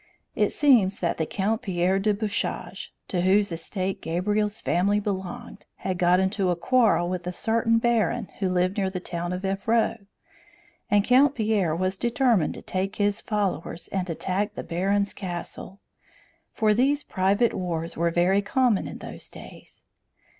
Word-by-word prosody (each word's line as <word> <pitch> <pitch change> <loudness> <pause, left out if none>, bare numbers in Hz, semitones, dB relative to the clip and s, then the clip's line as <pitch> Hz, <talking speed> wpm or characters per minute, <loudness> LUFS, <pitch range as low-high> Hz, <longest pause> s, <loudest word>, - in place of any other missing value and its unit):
It - - +2
seems 235 -10 +3
that 170 -2 -1
the 160 - 0
Count 215 +3 -1
Pierre 185 0 +1
de 210 +2 +2
Bouchage, 205 -1 -3 0.2
to 180 - -1
whose 195 +2 +3
estate 185 +3 -3
Gabriel's 205 +5 -1
family 200 +4 +1
belonged, 205 +4 -5
had 185 -2 -4
got 180 0 +4
into 190 0 +1
a 175 - +2
quarrel 210 -2 +3
with 180 -1 -4
a - - -1
certain 230 +4 +1
baron 230 -3 +1
who 190 -2 0
lived 185 +2 +1
near 195 -2 +1
the 185 -1 -4
town 175 -1 -4
of 180 +2 -4
Evreux, 220 +4 +1 0.9
and 205 -1 +4
Count 265 +5 +4
Pierre 210 -8 +1
was 185 +2 -1
determined 235 - +2
to - - -10
take 190 +2 -3
his 205 +1 0
followers 195 -5 -2
and 190 -2 -2
attack 190 +5 -2
the - - -5
baron's 195 +4 0
castle; 185 +1 -7 0.7
for 215 -2 +2
these 280 +6 +2
private 200 +5 +1
wars 170 -2 -3
were 170 +1 +1
very 180 +4 +2
common 235 0 +1
in - - -7
those - - -9
days. - - -13
195 Hz, 160 wpm, -25 LUFS, 180-215 Hz, 0.9 s, got